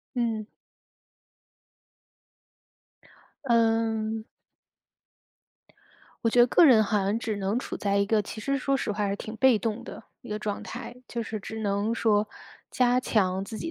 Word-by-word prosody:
嗯。 225 -3 -1 3.0
嗯。 225 -2 +1 2.0
我 - - +4
觉 235 - +1
得 240 - +8
个 335 - +6
人 225 -6 +6
好 210 0 +1
像 200 +3 0
只 225 -2 -3
能 200 +3 -1
处 - - -5
在 200 -1 0
一 200 - +3
个 215 +1 +2
其 210 +2 -7
实 275 +4 0
说 275 +1 +1
实 230 - -2
话 205 - -9
还 - - 0
是 200 - -1
挺 220 +2 -7
被 245 0 +5
动 225 +1 -3
的 - - -10 0.2
一 245 - -13
个 210 0 -3
状 210 -1 -4
态。 240 0 -7
就 235 - -3
是 220 -1 -5
只 220 +3 -7
能 205 +2 0
说 215 -2 +2 0.4
加 250 0 +3
强 190 -6 +1
自 220 +2 -7
己 330 - -4
220 Hz, 170 characters per minute, -27 LUFS, 210-235 Hz, 3.0 s, 得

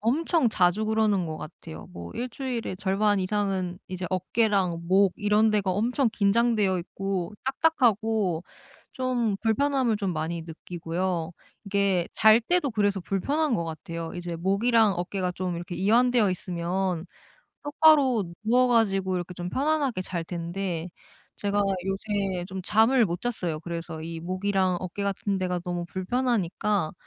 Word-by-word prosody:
엄청 290 - +2
자주 185 +1 +2
그러는 215 -4 +1
것 160 -1 -4
같아요. 80 - -9
뭐 85 0 -8
1 250 - -3
주일에 240 -6 -4
절반 200 +2 +1
이상은 190 -2 -1
이제 185 0 -4
어깨랑 185 -2 +1
목 190 +1 +4
이런 210 +1 +3
데가 205 -3 +1
엄청 235 +6 +1
긴장되어 210 -2 +2
있고 190 +1 -3
딱딱하고 225 - +1 0.5
좀 245 -5 0
불편함을 250 +1 +2
좀 200 -3 -2
많이 165 +1 -3
느끼고요. 170 +1 -4 0.3
이게 200 -3 +1
잘 220 +1 +6
때도 320 +3 +1
그래서 205 -3 +1
불편한 275 - 0
것 170 - -2
같아요. 165 +1 -6
이제 175 -1 -5
목이랑 205 +5 +3
어깨가 180 +1 -2
좀 180 -1 -3
이렇게 175 +1 -6
이완되어 225 +3 +3
있으면 180 -1 -2 0.6
똑바로 290 -6 +4 0.2
누워 250 +3 +4
가지고 195 -6 +2
이렇게 180 0 -4
좀 175 0 -5
편안하게 280 -4 0
잘 180 -2 -4
텐데 175 0 -4 0.5
제가 205 0 -1 0.3
요새 195 -2 -2
좀 190 0 -5
잠을 225 +5 +4
못 175 -1 -4
잤어요. 180 -10 -2
그래서 165 -1 -6
이 165 +1 -6
목이랑 185 +1 0
어깨 185 +2 -5
같은 200 0 -1
데가 180 -1 -1
너무 175 -1 -3
불편하니까 200 -3 -1
195 Hz, 305 characters per minute, -26 LUFS, 175-225 Hz, 0.6 s, 잘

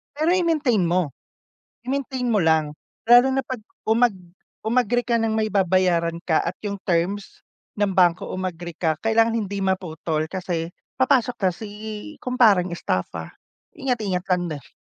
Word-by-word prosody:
Pero 310 +3 +1
i-maintain 310 - +2
mo. 170 -4 +1 0.7
I-maintain 260 -1 -2
mo 215 -3 +2
lang. 155 -2 +2 0.3
Lalo 245 +2 +8
na 270 0 0
'pag 255 -4 -6 0.3
umag 225 -1 +3 0.5
umagree 245 +1 +1
ka 235 -1 +1
ng 220 -1 0
may 215 -1 0
babayaran 180 -3 +2
ka 160 -3 +2
at - - -2
yung 200 -1 -3
terms 185 +4 -1 0.3
ng 205 -1 +1
bangko 180 -2 +2
umagree 175 -3 -5
ka, 160 -3 0
kailangan 225 +1 +3
hindi 200 -2 -2
maputol 165 -4 -1
kasi 175 -3 -3 0.2
papasok 260 -2 +2
ka 190 -4 +1
si 205 +4 -8 0.5
kumpareng 215 -8 +3
estafa. 170 - -3 0.4
Ingat-ingat 220 - -1
lang 180 -1 +2
din. 140 - -13
200 Hz, 140 wpm, -23 LUFS, 175-240 Hz, 0.7 s, Lalo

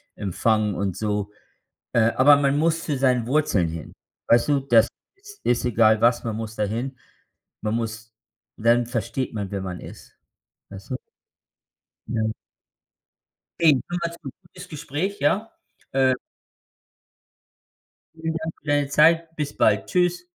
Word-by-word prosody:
empfangen 105 +1 0
und 95 -1 -2
so. 105 -1 -2 0.6
Äh, 115 -1 +3
aber 145 +3 +7
man 140 0 +2
muss 165 +1 +1
zu 145 -3 -1
seinen 125 -3 +2
Wurzeln 125 - +2
hin, 80 -2 -7 0.4
weißt 120 +4 +4
du? 140 -2 +3
Das 120 -4 +5 0.3
ist 410 +1 -15
ist 120 +1 +1
egal 110 -2 +4
was, 120 +1 +3
man 110 -2 -3
muss 110 -1 -5
da 105 - -1
hin. 120 +6 -3 0.7
Man 110 +1 -1
muss 110 -1 -5 0.4
dann 120 +1 +3
versteht 120 +1 -3
man, 100 -3 -4
wer 100 -1 -3
man 90 -2 -5
ist, - - -12 0.5
weißt 100 -1 -11
du? 130 - -2 1.1
Ja. 110 -2 -1 1.3
Jedenfalls 170 +2 +1
’n 135 - -5
gutes 180 +1 -12
Gespräch, 160 +5 -4
ja? 195 +10 +1 0.4
Äh 130 -1 +3 2.0
vielen 160 0 -3
Dank 160 0 -4
für 150 - -20
deine 145 -1 +2
Zeit. 165 +3 +3
Bis 150 -2 -4
bald. - - +2
Tschüss. 180 0 +1
125 Hz, 140 wpm, -24 LUFS, 110-155 Hz, 2.0 s, aber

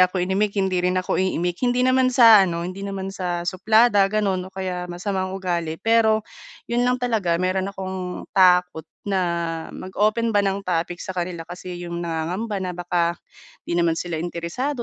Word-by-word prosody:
ako 185 +1 +4
inimik 200 +2 0
hindi 190 -2 +1
rin 180 +1 0
ako 185 0 0
iimik, 175 -2 -1
hindi 250 0 +2
naman 255 0 +4
sa 225 -7 +7
ano, 170 0 -3
hindi 185 +2 -6
naman 195 -1 -5
sa 175 -2 -3
suplada, 200 +2 +3
gano'n, 195 -3 -1
o - - -23
kaya 180 -2 -4
masamang 185 +1 -3
ugali. 170 -4 -2
Pero, 220 +1 +3 0.4
'yon 240 +1 -1
lang 250 - +2
talaga, 220 -9 0
meron 185 +2 0
akong, 190 -2 -5
takot 180 -3 +3 0.2
na 195 -2 +1 0.5
mag-open 215 +4 -1
ba 205 - +4
ng 195 0 -2
topic 175 0 -1
sa 190 - -6
kanila, 175 -2 -4
kasi 180 0 -8
'yong 170 -1 -5
nangangamba 175 +6 -3
na 185 -1 -3
baka, 175 -1 0 0.5
hindi 170 - -2
naman 165 - +3
sila 170 0 -4
interesado 175 - -3
185 Hz, 170 wpm, -23 LUFS, 175-205 Hz, 0.5 s, sa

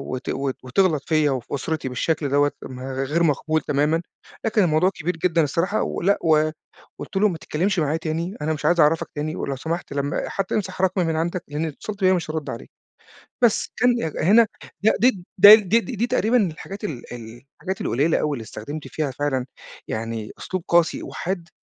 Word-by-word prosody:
وت 125 - -6
وت 135 -1 -2
وتغلط 150 +3 +1
فيَّ 155 -2 +3
وفي 130 0 -3
أُسرتي 145 -1 -3
بالشكل 145 +3 -1
دوّة، 145 +1 +3
م 130 -1 -8
غير 135 +5 -1
مقبول 155 0 +1
تمامًا، 150 +4 +1 0.4
لكن 220 -2 +3
الموضوع 170 +2 +3
كبير 180 -2 -4
جدًا 170 -1 +2
الصراحة، 170 +8 0
ولأ 200 +3 +1
و 155 -1 +3 0.5
قُلت - - -8
له: 210 - +4
"ما 170 - -4
تتكلمش 185 +6 -1
معايا 155 0 +1
تاني، 165 +4 -3
أنا 155 +1 0
مش 150 - -6
عايز 175 - +3
أعرفك 155 +1 +3
تاني، 150 +1 -3
ولو 140 - -3
سمحت 165 +4 -4
لمّا 140 +1 -2
حتى 195 -1 -2
امسح 190 -2 -2
رقمي 185 -1 +2
من 160 -1 0
عندك 170 +2 -1
لإن 150 +2 -3
لو - - -2
اتصلت 205 +7 -8
بيَّا 185 0 +5
مش 175 -4 -2
هارُدّ 155 -3 -4
عليك." 115 - -7 0.7
بس 230 -3 +3
كان 250 +2 +4
ي - - -3 0.2
هنا 220 +6 +6 0.4
لأ 220 - +5
دي 230 -7 +3
ده 205 +3 +11
دي 215 +1 +2
دي 240 +1 -6
دي 235 +4 0
تقريبًا 245 0 +2
الحاجات 195 +6 -9
ال 140 - -6
ال 115 0 -9
الحاجات 190 +1 -5
القليلة 145 +7 +1
أوي، 150 - 0
اللي 115 - -7
استخدمت 145 +8 -7
فيها 150 -3 -2
فعلًا 130 -2 -1 0.4
يعني 110 -1 -4
أسلوب 185 -2 -4
قاسي 170 -1 +2
وحاد، 175 -2 -4
160 Hz, 195 wpm, -23 LUFS, 145-185 Hz, 0.7 s, ده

